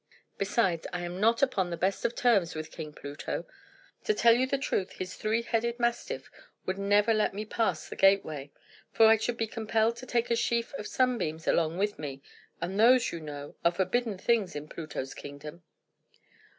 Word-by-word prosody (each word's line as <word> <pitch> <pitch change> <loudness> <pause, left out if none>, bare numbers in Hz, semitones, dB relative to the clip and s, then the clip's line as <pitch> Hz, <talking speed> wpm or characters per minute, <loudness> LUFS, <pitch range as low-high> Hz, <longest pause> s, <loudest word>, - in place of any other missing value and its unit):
Besides, 195 -4 +1
I 180 - -3
am 175 +1 -5
not 230 +5 +3
upon 195 -9 +1
the 170 - -4
best 190 +3 0
of 235 - 0
terms 200 -10 +2
with 155 0 -5
King 155 -2 -7
Pluto. 145 +4 -5 0.6
To 430 - +3
tell 235 -8 +6
you 255 +2 +2
the 275 +1 0
truth, 200 -8 -2
his 185 0 -6
three 220 +2 0
headed 235 +1 -1
mastiff 235 0 -2 0.3
would 190 +1 -2
never 205 +3 +3
let 215 -2 +1
me 210 +1 -4
pass 195 -8 -1
the - - -7
gateway; 160 -8 +2 0.4
for 225 - +5
I 220 0 +7
should 230 +2 -2
be 225 - 0
compelled 225 +1 0
to 255 +1 -9
take 240 -1 0
a - - +4
sheaf 235 +1 0
of 210 -6 -5
sunbeams 230 -12 0
along 165 0 +2
with 205 +2 -1
me, 140 -2 -6 0.4
and 185 +4 -3
those, 245 +2 +5
you 170 - -5
know, 145 -2 -8
are 170 - +5
forbidden 205 +4 0
things 205 -4 +1
in 145 +1 -5
Pluto's 155 -5 -6
kingdom." 150 +4 -9
200 Hz, 190 wpm, -29 LUFS, 170-230 Hz, 0.6 s, I